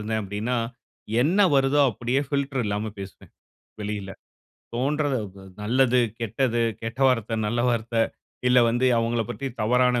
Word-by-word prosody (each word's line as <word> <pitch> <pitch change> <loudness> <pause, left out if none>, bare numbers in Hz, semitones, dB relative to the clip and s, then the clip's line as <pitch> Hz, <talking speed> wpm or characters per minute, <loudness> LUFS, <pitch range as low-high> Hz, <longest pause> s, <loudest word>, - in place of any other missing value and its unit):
இருந்தேன் 110 +1 -2
அப்படின்னா, 105 +5 -2 0.7
என்ன 170 +9 +2 0.2
வருதோ 135 +1 +3
அப்படியே 120 +5 -1
ஃபில்டர் 140 -2 -1
இல்லாம 105 +1 -2
பேசுவேன், 95 -1 -10 0.5
வெளியில. 105 -2 -4 0.6
தோன்றத 140 +3 0 0.2
வ 100 - -13 0.2
நல்லது, 125 +3 +3 0.2
கெட்டது, 115 +1 0 0.2
கெட்ட 115 +4 -5
வார்த்தை, 115 -3 0
நல்ல 120 +3 0
வார்த்தை, 115 -1 0 0.5
இல்லை 125 0 +6
வந்து 120 +2 +1
அவங்களைப் 115 -1 0
பத்தி 140 - -5
தவறான 125 +2 +3
120 Hz, 130 wpm, -25 LUFS, 110-130 Hz, 0.7 s, இல்லை